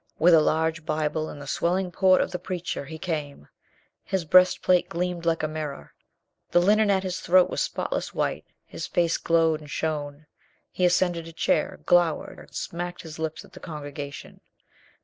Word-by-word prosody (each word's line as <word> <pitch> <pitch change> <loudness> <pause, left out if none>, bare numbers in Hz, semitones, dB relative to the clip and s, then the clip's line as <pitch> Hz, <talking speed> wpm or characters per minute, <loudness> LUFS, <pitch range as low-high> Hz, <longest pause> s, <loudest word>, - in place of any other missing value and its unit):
With 175 +2 +5
a 160 - +7
large 160 +1 0
Bible 155 0 -1
and 145 - -9
the 140 - -8
swelling 180 +5 0
port 185 +1 +4
of - - -2
the 180 - -4
preacher, 180 -4 -4
he 160 +3 -8
came. 150 - -4 0.6
His 190 -3 -2
breastplate 180 +1 +4
gleamed 175 0 -3
like 165 -1 +1
a - - +1
mirror, 155 -2 -6 0.6
the 175 - +4
linen 210 +4 +4
at 195 -1 +2
his 185 -1 -3
throat 185 +1 +4
was - - -1
spotless - - -2
white, - - -2 0.2
his - - -6
face 170 -1 +1
glowed 165 -2 +2
and 150 -1 -13
shone. 150 -1 -3 0.5
He 180 - +1
ascended 175 -2 +1
a - - -9
chair, 155 - 0
glowered, 175 -3 +2
and - - -14
smacked 175 +1 -5
his 160 -1 -9
lips 160 -1 -4
at - - -21
the - - -11
congregation. 145 -3 -8
165 Hz, 175 wpm, -25 LUFS, 155-180 Hz, 0.6 s, a